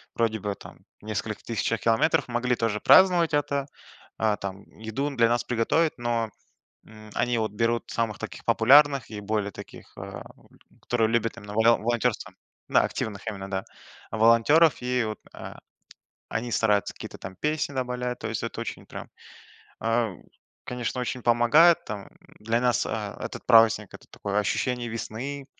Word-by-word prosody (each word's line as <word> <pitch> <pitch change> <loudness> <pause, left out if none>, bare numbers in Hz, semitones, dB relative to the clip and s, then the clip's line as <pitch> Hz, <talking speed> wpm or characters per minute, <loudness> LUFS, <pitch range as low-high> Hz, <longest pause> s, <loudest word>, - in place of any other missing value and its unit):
вроде 110 -2 0
бы 100 +1 -3
там - - -13 0.2
в - - -16
нескольких 110 0 -4
тысячах 115 0 -1
километров, 135 +7 +2
могли 125 +1 0
тоже 115 -3 -1
праздновать 180 -4 +5
это. 140 -1 0 0.5
А, 110 -2 +1
там 100 0 -6 0.2
еду 110 +6 -3
для 115 -1 +4
нас 120 +1 +1
приготовят, 125 +7 +1
но, 120 -2 -1 0.6
м, 110 -1 -14
они 120 0 +1
вот 110 -2 -1
берут 115 +2 0
самых 115 -3 -2
таких - - -8
популярных 140 +2 +5
и 105 -1 -6
более 105 0 -2
таких, - - -12
ам, - - -8 0.6
которые 115 -2 +1
любят 115 0 0
именно 105 0 -9
воло 115 +1 +5
волонтёрство. 120 0 -1 0.4
Да, - - +4
активных 105 0 -4
именно, 95 -3 -5
да, 95 -1 -2 0.5
волонтеров. 115 +9 +4
И 125 -1 0
вот, 110 -1 -4 0.2
а, - - -9 0.7
они 120 +2 -3
стараются 105 -3 +1
какие-то - - -9
там 95 - -9
песни 150 - -2
добавлять, 125 -1 -3
то - - -4
есть - - -3
это - - -4
очень - - -6
прям, - - -9 0.7
а, 115 -2 +1 0.5
конечно, 125 0 -3
очень 125 0 -3
помогает. 120 +9 +5
Там 105 -2 -7 0.3
для 115 +2 0
нас, 125 -4 +1
а, - - -4
этот - - -6
праздник- 115 -3 +5
это - - -12
такое 100 +1 -3
ощущение 120 +3 -1
весны, 125 +5 -5
115 Hz, 155 wpm, -26 LUFS, 110-125 Hz, 0.7 s, праздновать